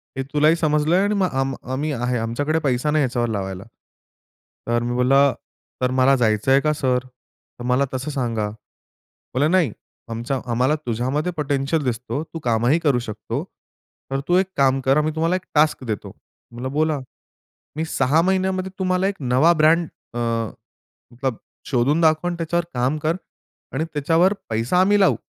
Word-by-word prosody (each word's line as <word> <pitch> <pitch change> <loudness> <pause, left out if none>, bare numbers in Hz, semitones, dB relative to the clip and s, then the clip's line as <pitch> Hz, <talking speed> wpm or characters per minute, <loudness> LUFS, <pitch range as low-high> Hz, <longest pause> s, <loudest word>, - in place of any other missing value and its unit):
हे 135 - -2
तुलाही 150 +2 +4
समजलंय 155 +3 +2
आणि 205 +1 +1
मग 190 -2 +2
आम 135 0 -1 0.2
आम्ही 145 +4 -1
आहे. 125 -2 -1
आमच्याकडे 145 +8 -1
पैसा 140 -1 0
नाही 155 0 +2
ह्याच्यावर 120 -2 0
लावायला. 95 -3 -4 1.0
तर 120 0 +1
मी 120 0 -2
बोलला 135 +2 +4 0.5
"तर 125 0 +1
मला 130 +1 +5
जायचंय 120 +2 +3
का 150 +1 +1
सर? 130 -4 +1 0.6
तर - - -6
मला 125 +2 +2
तसं 130 +4 -3
सांगा." 115 -6 -1 0.9
बोलला, 140 +4 +2
"नाही, 170 -7 +3 0.4
आमच्या 120 +4 -2
आम्हाला 130 +5 +2
तुझ्यामध्ये 130 +8 -1
पोटेन्शियल 145 +1 0
दिसतो. 125 +4 -2
तू 165 0 -8
कामही 120 +7 +3
करू 145 -6 +2
शकतो. 110 - -4 0.7
तर 135 - 0
तू 175 - +3
एक 190 0 +2
काम 135 -1 +3
कर. 135 +2 +4
आम्ही 150 +1 +1
तुम्हाला 165 +3 +1
एक 185 - -4
टास्क 150 -2 +3
देतो." 110 -5 -4 0.4
म्हणलं 125 +2 -5
"बोला." 155 0 +1 0.8
"मी 160 +1 -2
6 160 0 +2
महिन्यामध्ये 190 +1 0
तुम्हाला 185 0 +1
एक 200 - -2
नवा 130 +6 +4
ब्रँड 165 +2 +4 0.3
अ, - - -2 0.9
मतलब 125 -1 -3 0.3
शोधून 140 +5 +1
दाखवं 160 +2 +3
आणि 175 - -4
त्याच्यावर 170 +1 -1
काम 130 +4 0
कर 160 +2 +1 0.6
आणि 150 +4 -1
त्याच्यावर 165 +6 +3 0.2
पैसा 115 +10 +1
आम्ही 205 +2 +4
लावू. 195 - +4
140 Hz, 160 wpm, -22 LUFS, 125-160 Hz, 1.0 s, मला